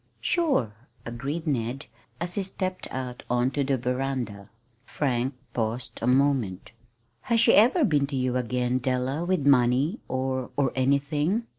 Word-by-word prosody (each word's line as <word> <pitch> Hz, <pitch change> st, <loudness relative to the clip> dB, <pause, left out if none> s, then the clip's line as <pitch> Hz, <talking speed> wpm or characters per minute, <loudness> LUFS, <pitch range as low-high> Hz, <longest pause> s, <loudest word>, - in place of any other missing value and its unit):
"Sure!" 280 Hz, -, +1 dB, 0.3 s
agreed 135 Hz, +8 st, -4 dB
Ned, 130 Hz, -1 st, -2 dB, 0.3 s
as 175 Hz, +1 st, -3 dB
he 200 Hz, -, 0 dB
stepped 185 Hz, -1 st, -3 dB
out 125 Hz, -1 st, -5 dB
on 125 Hz, +1 st, +2 dB
to 140 Hz, -, 0 dB
the 135 Hz, -1 st, +1 dB
veranda. 125 Hz, -5 st, -3 dB, 0.3 s
Frank 130 Hz, -1 st, -1 dB, 0.2 s
paused 115 Hz, +1 st, -2 dB
a 115 Hz, -, -1 dB
moment. 130 Hz, -8 st, +1 dB, 0.6 s
"Has 230 Hz, -1 st, +4 dB
she 235 Hz, -, +5 dB
ever 265 Hz, -, +5 dB
been 145 Hz, -, +2 dB
to 140 Hz, -, -5 dB
you 130 Hz, -1 st, 0 dB
again, 125 Hz, 0 st, 0 dB
Della, 130 Hz, +4 st, -1 dB
with 175 Hz, -5 st, 0 dB
money, 135 Hz, -, +3 dB
or 130 Hz, 0 st, -2 dB
or 135 Hz, -3 st, +2 dB
anything?" 145 Hz, -, +1 dB
135 Hz, 145 wpm, -26 LUFS, 125-150 Hz, 0.6 s, she